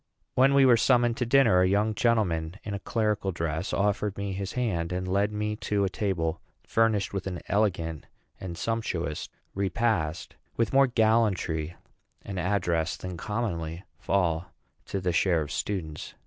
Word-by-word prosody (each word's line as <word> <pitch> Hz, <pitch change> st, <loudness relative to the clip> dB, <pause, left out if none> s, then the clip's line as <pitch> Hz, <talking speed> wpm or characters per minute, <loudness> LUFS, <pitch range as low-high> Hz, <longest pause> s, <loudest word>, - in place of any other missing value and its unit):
When 135 Hz, +2 st, +4 dB
we 140 Hz, -1 st, +6 dB
were 125 Hz, -2 st, +6 dB
summoned 120 Hz, 0 st, +3 dB
to 125 Hz, -, -1 dB
dinner, 120 Hz, -8 st, +5 dB
a 90 Hz, -, +4 dB
young 105 Hz, +3 st, +2 dB
gentleman 100 Hz, -8 st, +1 dB
in 105 Hz, -, -5 dB
a 100 Hz, -, -3 dB
clerical 105 Hz, -3 st, 0 dB
dress 80 Hz, 0 st, -2 dB
offered 105 Hz, 0 st, 0 dB
me 100 Hz, -1 st, -3 dB
his 95 Hz, 0 st, -4 dB
hand, 90 Hz, -9 st, -1 dB
and 90 Hz, +1 st, -2 dB
led 100 Hz, +3 st, +1 dB
me 105 Hz, 0 st, -2 dB
to 105 Hz, -1 st, 0 dB
a 95 Hz, -, +1 dB
table 90 Hz, -5 st, -1 dB, 0.2 s
furnished 110 Hz, -4 st, +1 dB
with 95 Hz, -1 st, -3 dB
an 90 Hz, -2 st, -4 dB
elegant 85 Hz, -7 st, 0 dB, 0.3 s
and 85 Hz, -3 st, -6 dB
sumptuous 90 Hz, -8 st, -2 dB, 0.2 s
repast, 95 Hz, -5 st, -1 dB, 0.2 s
with 115 Hz, +1 st, +1 dB
more 135 Hz, 0 st, +6 dB
gallantry 110 Hz, -9 st, +1 dB, 0.5 s
and 95 Hz, -2 st, -5 dB
address 90 Hz, -3 st, 0 dB
than 90 Hz, -1 st, -6 dB
commonly 85 Hz, -5 st, -3 dB, 0.2 s
fall 85 Hz, -3 st, 0 dB, 0.4 s
to 100 Hz, -, -2 dB
the 90 Hz, -1 st, 0 dB
share 85 Hz, -1 st, +3 dB
of 75 Hz, -, -8 dB
students. 80 Hz, -2 st, -4 dB
100 Hz, 160 wpm, -27 LUFS, 85-110 Hz, 0.5 s, we